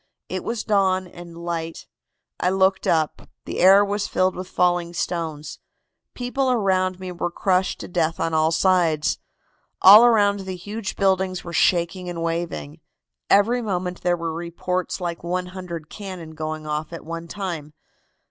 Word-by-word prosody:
It - - -3
was 230 -2 -3
dawn 190 -3 +2
and 175 -1 -12
light. 170 -1 -4 0.5
I 180 - +2
looked 190 0 +2
up. 160 -2 0 0.2
The - - -4
air 195 +3 +7
was 205 0 -2
filled 185 0 +1
with 185 0 -6
falling 175 -1 +1
stones. 160 -4 -3 0.6
People 255 +2 -1
around 185 -5 +1
me 185 -1 -6
were 175 0 -2
crushed 185 +1 0
to - - -7
death 165 -2 -1
on 165 0 -1
all 160 0 +3
sides. 170 -4 +2 0.6
All 205 +4 +10
around 205 -4 +4
the 190 -1 -5
huge 205 +3 -5
buildings 190 -2 +1
were 170 - -8
shaking 180 +1 +1
and 170 -1 -4
waving. 165 - -3 0.5
Every 235 +5 +4
moment 180 -4 -3
there 175 0 +1
were 165 -1 -3
reports 175 +2 -3
like 170 -2 -4
100 180 -2 -4
cannon 185 -5 -8
going 155 0 -5
off 150 +1 -3
at 165 - -8
one 165 +1 -6
time. 170 -6 -5
180 Hz, 155 wpm, -23 LUFS, 165-190 Hz, 0.6 s, All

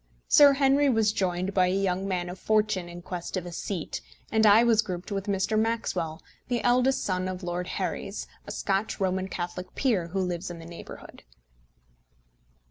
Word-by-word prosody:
Sir 285 -1 +8
Henry 275 +1 +3
was 220 -4 +3
joined 185 -1 -1
by 185 -1 +4
a 185 - +1
young 195 0 0
man 180 -2 -1
of 180 +1 -7
fortune 210 -5 +1
in 175 0 -9
quest 180 +1 -5
of 180 - -4
a 175 - -6
seat, 170 - -4 0.3
and 220 -1 +4
I 210 +3 +7
was 230 -2 +4
grouped 185 -1 -6
with 195 0 -3
Mr. 200 +2 +1
Maxwell, 220 -8 -1 0.2
the 245 -2 -1
eldest 250 +2 +3
son 185 -1 -1
of 185 0 -5
Lord 175 0 -3
Herries, - - -3 0.2
a - - -5
Scotch 195 +2 -1
Roman 190 -1 0
Catholic 180 0 -5
peer 215 -11 +1
who 190 +3 -3
lives 180 0 -2
in 175 - -7
the 165 - -10
neighbourhood. 170 0 -10
190 Hz, 180 wpm, -27 LUFS, 180-220 Hz, 0.3 s, Sir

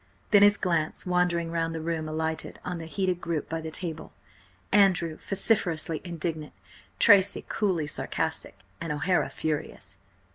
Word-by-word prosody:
Then 205 -2 +7
his 205 +1 +6
glance, 165 -4 -1
wandering 180 -2 +1
round 165 -1 -1
the - - -3
room, 160 -1 -3
alighted 160 0 -3
on 180 -1 -3
the 165 - -7
heated 185 0 -1
group 165 -3 -2
by 165 0 -3
the 160 - -5
table; 160 0 -6 0.6
Andrew 185 -5 +4
vociferously 180 -6 +1
indignant, 165 -3 -4 0.4
Tracy 200 -1 +5
coolly 185 -7 0
sarcastic, 150 - -2 0.2
and 165 -2 -3
O'Hara 175 +5 +1
furious. 155 -2 -4
170 Hz, 140 wpm, -27 LUFS, 160-185 Hz, 0.6 s, Then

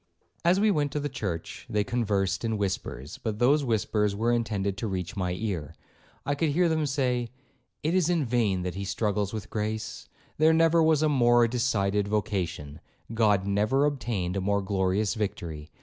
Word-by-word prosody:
'As 175 +3 +4
we 215 +1 +4
went 145 -5 0
to 150 - 0
the 145 - -2
church, 95 -10 -5
they 105 -1 +1
conversed 100 -3 0
in 110 -1 0
whispers, 95 -9 -4
but 110 -2 -3
those 140 +6 +3
whispers 105 -3 0
were 115 +3 +1
intended 105 -5 -1
to 115 - -3
reach 90 -2 -4
my 90 -3 -1
ear. 90 -6 -4 0.5
I 145 - +1
could 155 +2 0
hear 175 +5 +3
them 155 -2 +1
say, 125 -4 0 0.5
'It 160 +3 +1
is 180 -3 +2
in 170 -5 +1
vain 110 -6 +1
that 90 -1 -3
he 100 +3 -5
struggles 105 0 -1
with 110 -1 -6
grace; 110 0 -4 0.3
there 160 +1 +5
never 165 +1 +4
was 160 -1 +3
a - - +4
more 120 -4 +4
decided 105 -5 0
vocation; 90 -8 -2 0.3
God 105 -4 +3
never 105 +8 +2
obtained 115 -11 -2
a 100 - -1
more 100 +1 0
glorious 95 +1 0
victory. 85 -8 -4
110 Hz, 180 wpm, -27 LUFS, 95-135 Hz, 0.5 s, there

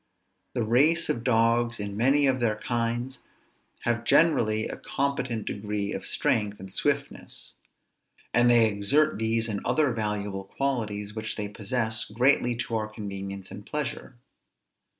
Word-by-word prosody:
The 120 - +1
race 145 +10 +3
of 115 - -1
dogs, 115 -1 +2
in 100 -1 -4
many 135 +6 +4
of 130 -1 +2
their 115 -3 +1
kinds, 120 +3 -2 0.6
have 120 0 0
generally 110 -11 +3
a - - -5
competent 130 -5 -2
degree 105 0 -3
of - - -4
strength 105 -2 0
and 95 0 -10
swiftness; 140 +3 -2 0.8
and 120 0 +5
they 120 -2 +6
exert 110 +8 +1
these 115 0 +1
and 105 -3 -3
other 150 -5 +2
valuable 105 -3 -2
qualities 105 -5 -2
which 110 -1 -3
they 105 -1 -3
possess, 110 +2 -2
greatly 120 +2 +2
to 115 0 -3
our 110 -1 -2
convenience 100 -3 -7
and 100 +1 -8
pleasure. 140 -1 -4
115 Hz, 140 wpm, -27 LUFS, 105-125 Hz, 0.8 s, they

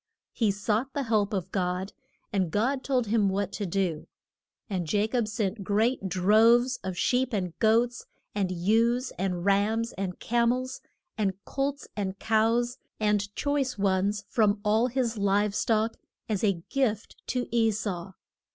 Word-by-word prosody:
He 225 -3 +1
sought 215 +6 -1
the 285 - 0
help 215 -4 +1
of 190 -3 -3
God, 185 0 -2 0.4
and 190 -4 +1
God 255 - 0
told 255 -3 +1
him 210 -2 +2
what 200 0 -1
to 205 - -3
do. 175 -4 -1 0.6
And 180 -7 -3
Ja 205 0 +3
cob 230 0 0
sent 210 -2 -2
great 210 +1 +1
droves 225 +7 +4
of 185 -1 -4
sheep 255 0 +1
and 180 -5 -1
goats, 235 +3 +2 0.3
and 195 -3 0
ewes 230 +8 +2
and 180 -2 -1
rams, 215 +4 +2
and 185 -2 -3
ca 235 0 +1
mels 255 +2 -1 0.4
and 195 -3 +1
colts, 280 +1 -2
and 195 -2 -3
cows, 230 +3 +1 0.2
and 210 -1 +1
choice 280 -4 0
ones 200 +1 +1
from 210 -2 +2
all 220 +3 +3
his 240 -3 -1
live 200 +1 +2
stock, 220 +1 +1 0.3
as 215 -2 -1
a 195 -6 +1
gift 225 -6 -1
to 250 -1 -1
E 230 -1 +3
sau. 195 -4 -3
215 Hz, 155 wpm, -28 LUFS, 195-235 Hz, 0.6 s, droves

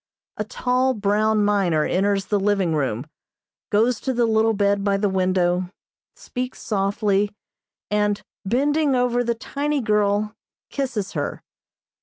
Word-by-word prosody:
A 210 - -1
tall, 255 +4 0
brown 210 +1 +2
miner 185 -7 +2
enters 195 +1 +1
the 205 - 0
living 195 -4 +1
room, 130 -4 -1 0.6
goes 225 +3 +2
to 260 - -2
the 240 -1 +2
little 225 0 +3
bed 200 0 +1
by 200 -1 +2
the 205 +1 +1
window, 185 -1 +1 0.5
speaks 250 +1 -5
softly, 205 0 0 0.6
and, 210 -1 +1 0.2
bending 280 +6 +1
over 245 -1 +2
the 235 0 0
tiny 285 +5 -2
girl, 210 -2 +1 0.4
kisses 240 -8 -2
her. - - -4
210 Hz, 130 wpm, -23 LUFS, 195-240 Hz, 0.6 s, little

